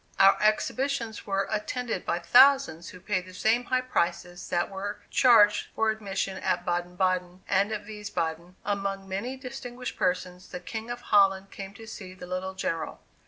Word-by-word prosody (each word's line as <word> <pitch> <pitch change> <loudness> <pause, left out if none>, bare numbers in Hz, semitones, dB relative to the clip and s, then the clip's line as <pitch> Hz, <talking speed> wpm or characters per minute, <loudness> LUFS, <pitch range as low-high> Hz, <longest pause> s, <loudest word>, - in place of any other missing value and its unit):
Our 195 0 +8
exhibitions 230 +2 0
were 195 0 0
attended 220 0 -2
by 170 - +1
thousands 245 - +5
who 180 - -11
paid 185 -1 -2
the 185 - -12
same 230 +5 +2
high 255 0 +1
prices 175 -6 -2
that 175 +2 0
were 200 +2 -4
charged 220 -5 +5
for 220 0 +2
admission 195 -3 -3
at - - -1
Baden 175 0 -2
Baden, 185 0 0
and 200 +2 +2
at 210 -1 -4
Wiesbaden, 180 -5 -4
among 195 -1 -2
many 215 +8 -3
distinguished 250 -1 -7
persons, 180 0 -1
the 180 - -6
King 220 +5 -6
of 240 0 -5
Holland 195 -3 +3
came 195 0 -8
to 225 - -11
see 190 -4 -9
the 185 - -9
little 185 +1 -4
General. 165 -3 -3
195 Hz, 165 wpm, -28 LUFS, 185-220 Hz, -, Our